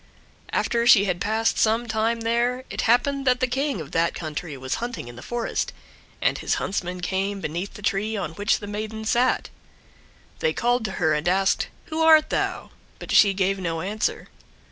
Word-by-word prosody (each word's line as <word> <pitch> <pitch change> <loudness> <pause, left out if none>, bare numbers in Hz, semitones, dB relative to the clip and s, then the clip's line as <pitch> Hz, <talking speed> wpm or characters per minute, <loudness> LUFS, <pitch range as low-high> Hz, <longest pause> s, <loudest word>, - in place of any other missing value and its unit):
After 235 0 +1
she 200 -4 +7
had 180 -2 -2
passed 220 +2 +1
some 225 +2 +2
time 225 +1 0
there, 240 +3 0
it - - -2
happened 275 +3 +2
that 250 0 +4
the 255 - +3
King 270 -1 -1
of 155 -3 -8
that 165 +1 +1
country 155 -2 -5
was 130 - -3
hunting 240 - -4
in 120 - -10
the 120 - -10
forest, 235 - -2 0.5
and - - +2
his - - 0
huntsmen 180 -2 -3
came 195 +2 -1
beneath 175 +3 -4
the 205 - -10
tree 210 +2 0
on 160 -6 -3
which 205 +6 +1
the 205 - -8
maiden 215 +1 -5
sat. 245 +3 +1 0.9
They 485 -1 +1
called 245 -1 +1
to 200 - -2
her 160 -4 +1
and 150 +2 -1
asked, 190 +2 +2 0.2
"Who 320 +1 -1
art 315 -1 +6
thou?" - - -2 0.3
But - - -8
she 200 -2 +6
gave 195 0 +1
no 165 -3 -2
answer. 210 +5 -2
210 Hz, 190 wpm, -24 LUFS, 180-240 Hz, 0.9 s, she